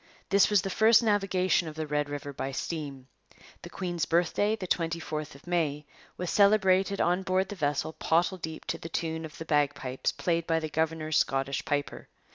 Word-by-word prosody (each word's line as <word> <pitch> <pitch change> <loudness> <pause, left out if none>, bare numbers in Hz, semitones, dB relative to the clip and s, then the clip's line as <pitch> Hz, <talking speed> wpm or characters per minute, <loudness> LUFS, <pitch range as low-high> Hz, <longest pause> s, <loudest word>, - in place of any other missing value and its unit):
This 200 +1 +5
was 205 -3 +3
the 195 - -3
first 220 +4 +5
navigation 190 -5 +2
of 155 - -7
the 160 0 -3
Red 150 -1 -1
River 145 0 -5
by 135 0 -4
steam. 140 -4 -5 0.5
The - - -9
Queen's 175 -3 -3
Birthday, 180 +5 +2
the 195 - -6
24th 165 -4 -2
of 140 - -16
May, 155 -4 -1 0.3
was 180 -1 -3
celebrated 200 -1 +4
on 180 +2 +2
board 190 0 0
the 205 - -5
vessel 150 -1 -1
pottle 175 +4 +1
deep 160 -1 -6
to 165 0 -3
the 165 - -7
tune 160 0 -3
of 155 - -11
the 165 - -7
bagpipes 145 -4 0
played 170 -1 -1
by 165 -1 +2
the 155 -1 -4
governor's 160 0 0
Scottish 135 0 0
piper. 145 0 -2
165 Hz, 185 wpm, -28 LUFS, 150-185 Hz, 0.5 s, This